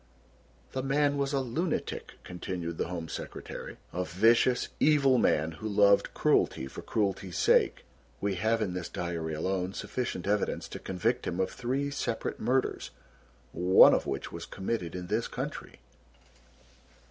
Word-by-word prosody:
"The 130 - -2
man 140 +2 +2
was 140 -1 0
a 140 -2 +1
lunatic," 150 +7 -3
continued 90 -2 -5
the - - 0
Home 85 -2 -5
Secretary, - - -7 0.2
"a 90 - -1
vicious, 115 +8 +3
evil 140 -4 +4
man 80 +2 +2
who 110 +7 -6
loved 100 -1 +4
cruelty - - +2
for 65 - -8
cruelty's 95 -4 -2
sake. - - +3 0.3
We 100 0 0
have 110 +4 +1
in 95 -4 -3
this 90 -2 -4
diary 85 -3 -3
alone 95 +3 -2
sufficient 105 -3 -3
evidence 105 +1 0
to - - -7
convict 115 +7 -1
him 90 - -2
of 95 - 0
three 135 +4 -2
separate 120 -4 -3
murders, 130 +1 0 0.6
one 90 +2 +7
of - - +1
which 70 - -3
was - - -7
committed 95 -3 -3
in 90 -1 -5
this 110 +5 -1
country." - - -6
100 Hz, 145 wpm, -29 LUFS, 90-125 Hz, 0.6 s, one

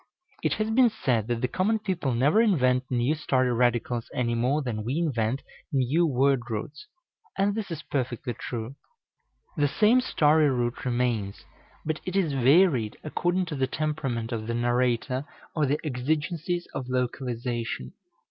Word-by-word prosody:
It - - +1
has 215 0 -1
been 245 +1 +5
said 125 - 0
that 120 -1 -1
the 125 - +1
common 200 - +1
people 180 - -2
never 145 - +4
invent 130 - +2
new 125 +3 +1
story 130 -5 +1
radicals 120 0 0
any 120 -2 0
more 130 +6 +1
than 110 -4 -3
we 125 +7 -2
invent 130 -6 0 0.3
new 140 +6 +2
word 135 -2 +2
roots; 145 +9 -5 0.5
and 200 +1 +2
this 215 -2 -4
is 165 -2 -5
perfectly 125 -2 -3
true. 115 +1 -5 0.8
The 145 -1 +3
same 220 - +4
story 155 - +3
root 120 -1 -1
remains, 120 -5 -1 0.4
but 155 0 -1
it 185 - -5
is 175 -7 +1
varied 135 - +4
according 175 +4 0
to 160 - -4
the 135 -1 0
temperament 135 -6 -2
of 110 -2 -3
the 115 - -1
narrator 120 +2 +1 0.3
or 150 -3 +2
the 145 +3 +1
exigencies 155 +6 -1
of 130 -1 -5
localization. 120 - -3
130 Hz, 155 wpm, -27 LUFS, 120-155 Hz, 0.8 s, been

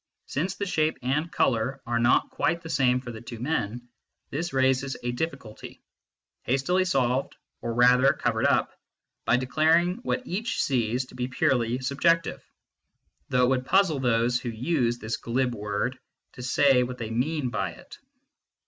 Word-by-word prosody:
Since 180 +7 -2
the 200 - -3
shape 155 -4 0
and 150 +6 -1
colour 130 +2 0
are 120 0 0
not 120 +1 +3
quite 170 -2 -1
the 165 - -6
same 125 -2 +2
for 125 -2 -7
the 110 -1 -9
two 120 0 -8
men, 120 -3 -3 0.4
this 165 +4 -3
raises 130 0 +1
a 120 - -1
difficulty, 135 -5 -6 0.6
hastily 175 +9 +1
solved, 130 -6 0 0.3
or 115 -1 -3
rather 125 +3 +5
covered 120 +1 0
up, 140 - +1 0.5
by 125 - +4
declaring 160 +8 +2
what 250 +1 -3
each 225 +8 -3
sees 125 -1 0
to - - -17
be 125 0 -3
purely 130 -4 +1
" - - -11
sub 140 +2 -4
jective 165 -1 +2 0.4
" - - -48
though 125 0 +3
it 125 - +4
would 130 -1 0
puzzle 190 -7 +3
those 120 -1 +2
who 120 - -5
use 120 0 0
this 110 -1 -4
glib 125 +2 -1
word 105 +4 -3 0.3
to 125 - -10
say 130 +1 +4
what 125 0 -3
they 115 -2 -5
mean 135 +3 -1
by 95 -7 -2
it. - - -14
130 Hz, 170 wpm, -26 LUFS, 120-155 Hz, 0.6 s, rather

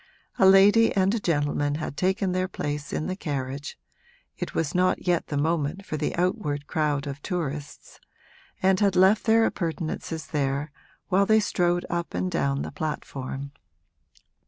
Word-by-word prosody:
A 190 - +7
lady 205 +4 +6
and 195 +1 +3
a 230 - 0
gentleman 145 -4 0
had 150 -2 -4
taken 190 +3 0
their 185 0 0
place 145 -5 -4
in 155 - -2
the 185 - -2
carriage 140 -4 -4 0.6
(it - - -6
was 160 -3 -1
not 180 0 +1
yet 175 -2 +1
the 145 - -3
moment 160 +4 -1
for - - -4
the 150 0 -2
outward 170 -5 -1
crowd 150 -3 0
of 140 0 -6
tourists) 150 -6 -5 0.6
and 190 0 +4
had 200 -3 +2
left 190 +3 +4
their 225 0 +5
appurtenances 165 -3 -3
there 145 0 -2 0.4
while 195 +1 +3
they 220 0 +5
strolled 175 -3 +1
up 170 0 -3
and 185 - -1
down 140 -4 0
the - - -6
platform. 140 -4 -5
165 Hz, 160 wpm, -26 LUFS, 145-190 Hz, 0.6 s, A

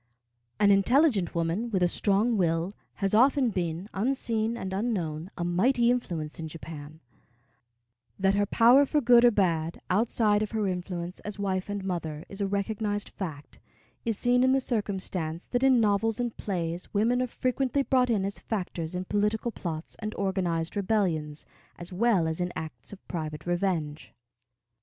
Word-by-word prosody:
An 205 -1 +5
intelligent 205 - +3
woman, 170 +8 -1
with 190 -5 +1
a - - +5
strong 205 +6 +1
will, 170 0 0 0.2
has 195 0 -1
often 255 +2 +4
been, 175 0 -3
unseen 230 0 0
and 190 -4 -5
unknown, 185 -6 -2
a 175 - -2
mighty 235 +8 +3
influence 170 -12 -3
in 160 - -4
Japan. 155 -1 -9 1.2
That 195 0 +2
her 205 0 +1
power 250 +7 +6
for 300 - +2
good 240 -2 +6
or 245 - +8
bad, 170 -6 0
outside 210 +1 +2
of 215 +1 -3
her 215 -2 0
influence 180 -1 -4
as 210 0 -7
wife 190 -1 -2
and 205 -1 -3
mother, 165 -4 -4
is 195 +1 -7
a 200 - +1
recognized 205 +1 -2
fact, 155 -7 -7 0.4
is 225 -3 -1
seen 245 +2 +3
in 260 0 +4
the 270 - +4
circumstance 190 -8 -2
that 245 - -1
in 265 -2 +5
novels 220 +1 +2
and 240 -2 -2
plays 175 -3 -3
women 235 +5 +2
are 255 - 0
frequently 260 +2 0
brought 255 -2 +2
in 205 -4 +1
as 200 - -4
factors 180 -5 -4
in 180 +1 -3
political 210 +4 0
plots 165 -6 -6
and 215 0 -5
organized 180 -4 -1
rebellions, 180 -8 0 0.3
as 175 +2 -8
well 195 -4 +2
as 160 +2 -2
in 180 0 -1
acts 160 0 -7
of 200 - -13
private 155 -3 -5
revenge. 175 -4 -2
195 Hz, 165 wpm, -28 LUFS, 170-225 Hz, 1.2 s, or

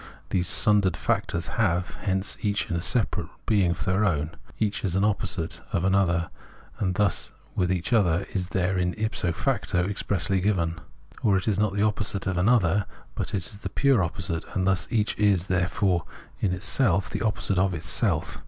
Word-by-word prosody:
These 90 -1 +1
sundered 100 -3 +3
factors 85 -1 -1 0.2
have, 90 -4 +1
hence, 95 -1 -1
each 100 -1 -1
a 85 -1 -1
separate 95 -5 0 0.2
being 100 -5 +3
of 85 - -2
their 95 +3 +2
own; 80 -6 0 0.3
each 105 -2 -1
is 95 -3 -1
an 95 - +2
opposite— 100 -5 -1
of 85 - 0
an 95 0 +2
other; 85 -4 +2 0.5
and 95 -2 0
thus 100 -3 +1 0.2
with 90 -1 +1
each 90 +5 -1
the 115 - +6
other 90 -1 +1
is 90 -2 -1
therein 90 -1 0
if 110 0 -2
so 85 - 0
facto 90 +2 0
expressly 95 -1 0
given; 85 -4 0 0.4
or 100 -3 +3
it 95 - -3
is 105 -2 +1
not 105 -2 +1
the 100 - +1
opposite 105 -2 -1
of 95 -2 0
an 95 +5 +3
other, 100 -5 +3 0.3
but - - -3
only 90 -3 -2 0.2
the - - -4
pure 135 -8 +3
opposite; 85 -1 -3
and 95 - +1
thus 95 0 +1
each 105 -3 0
is, 100 -4 +3
therefore, 90 -1 +1 0.3
in 100 - +1
itself 95 +1 +1
the - - -4
opposite 100 -3 +1
of 95 -1 +2
itself. 75 -3 0
95 Hz, 185 wpm, -26 LUFS, 90-100 Hz, 0.5 s, the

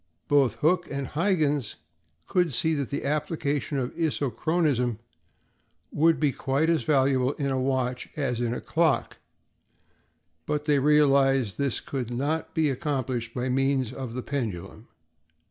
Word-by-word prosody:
Both 140 -6 +3
Hooke 175 +3 +2
and 140 -1 -3
Huyghens 150 - 0 0.5
could 175 -7 +1
see 160 +5 +2
that 140 -4 -2
the 140 - -3
application 145 -1 -1
of 125 -2 -2
isochronism 145 -4 0 0.9
would 160 +1 +3
be 150 -3 +2
quite 140 +5 0
as 165 - +2
valuable 135 -2 +2
in 140 -2 -2
a 130 -1 0
watch 130 -1 -1
as 125 -5 -1
in 120 -1 0
a 125 - -3
clock, 160 -6 0 1.3
but 150 0 -1
they 145 -2 +3
realized 135 -5 +3
that 140 - 0
this 135 - 0
could 130 -4 -4
not 145 +6 -2
be 155 -3 +2
accomplished 130 -5 -3
by 125 0 -1
means 135 -1 +1
of 130 -3 -6
the 125 - -4
pendulum. 110 -5 -5
140 Hz, 145 wpm, -26 LUFS, 125-150 Hz, 1.3 s, Both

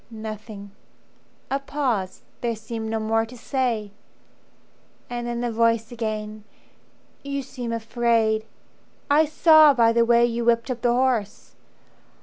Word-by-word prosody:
"Nothing." 215 -2 -8 0.8
A 275 - +1
pause: 255 -10 -3 0.2
there 235 -1 -1
seemed 220 0 -6
no 225 0 -1
more 225 +1 +1
to 235 +2 -10
say. 235 -5 -2 1.2
And 240 0 -4
then 240 0 -3
the 240 -1 -1
voice 230 0 +1
again: 215 -2 -5 0.8
"You 280 0 -4
seem 250 -3 -6
afraid. 225 -1 0 0.7
I 305 +2 +5
saw 310 -1 +6
by 230 -2 +4
the 235 0 +4
way 235 0 +4
you 235 0 -2
whipped 235 +2 +1
up 245 -2 -5
the 240 - +2
horse. 225 - -1
230 Hz, 130 wpm, -23 LUFS, 220-245 Hz, 1.2 s, saw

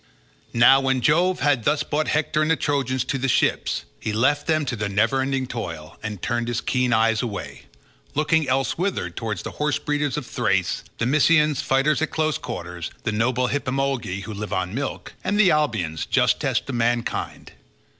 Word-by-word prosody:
Now 120 +3 +6
when 135 -1 +1
Jove 175 +7 +2
had 140 -5 +2
thus 150 - +2
brought 155 +1 -1
Hector 150 0 +1
and 155 - +1
the 165 - +4
Trojans 130 -4 0
to 135 - -2
the 135 - 0
ships, 125 - +1
he 110 - -3
left 135 +7 +1
them 155 -2 +2
to 125 - -2
their 105 -2 -2
never 105 +7 +2
ending 135 0 -1
toil, 85 -11 -6
and 105 -3 -5
turned 120 -2 -1
his 120 -1 -1
keen 125 +1 0
eyes 115 -1 +3
away, 115 -5 -6 0.5
looking 155 -1 +2
elsewhither 150 +9 0
towards 110 -2 -4
the - - -5
horse 150 0 +1
breeders 145 -3 -1
of - - -4
Thrace, - - 0
the 115 - 0
Mysians, 150 +1 +3
fighters 135 +3 +2
at 160 - 0
close 155 -1 0
quarters, 90 -1 -6
the 110 - -1
noble 125 +3 +1
Hippemolgi, 135 -7 -1
who 110 - -6
live 105 +1 -6
on 95 0 -2
milk, 135 +3 -4
and 205 +1 0
the 200 -4 +6
Abians, 110 - 0
justest - - +1
of 140 - -4
mankind. 120 0 -2
130 Hz, 180 wpm, -23 LUFS, 115-150 Hz, 0.5 s, Now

